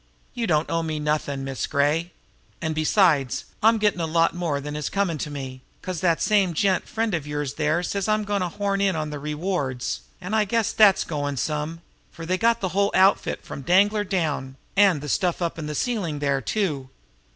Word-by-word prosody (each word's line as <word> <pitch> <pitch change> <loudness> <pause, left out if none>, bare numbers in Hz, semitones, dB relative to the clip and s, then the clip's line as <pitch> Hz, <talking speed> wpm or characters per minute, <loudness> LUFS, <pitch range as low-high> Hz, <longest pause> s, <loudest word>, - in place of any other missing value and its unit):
You 235 -2 -2
don't 155 -1 +2
owe 165 - 0
me 160 -1 -3
nothin', 150 -2 -1
Miss 135 -1 -3
Gray; 150 +4 +1 0.5
and, 160 -1 -2
besides, 155 -4 +2 0.2
I'm 225 +1 +5
gettin' 210 -4 +1
a 165 - 0
lot 165 +1 +2
more 170 -5 -1
than 150 +1 -6
is 150 -1 -3
comm' 200 -4 0
to 150 - -3
me, 135 -3 -7 0.2
'cause 185 -3 -4
that 170 -3 +2
same 195 -5 +2
gent 190 +3 +1
friend 225 -2 -1
of 155 -4 -2
yours 145 -2 -3
there 155 +3 0
says 195 +2 -2
I'm 215 0 +2
goin' 205 -1 -1
to 180 - -1
horn 200 +2 -1
in 195 -3 +2
on 155 -1 -3
the 150 - -5
rewards, 150 -4 -2 0.2
and 185 +4 -3
I 215 - +4
guess 220 +1 0
that's 205 -4 +5
goin' 145 -3 -3
some, 150 +6 -2 0.3
for 165 - -8
they 185 +2 0
got 230 0 +2
the 190 - 0
whole 200 +2 +2
outfit 190 +1 +3
from - - -7
Danglar 205 +7 +3
down, 150 -8 -2 0.2
and 195 -7 +4
the 150 - -6
stuff 175 +4 0
up 170 -2 -2
in 150 - -4
the 150 - -4
ceiling 200 -11 -1
there, 140 -1 0
too." 145 - -2
165 Hz, 205 wpm, -24 LUFS, 150-195 Hz, 0.5 s, I'm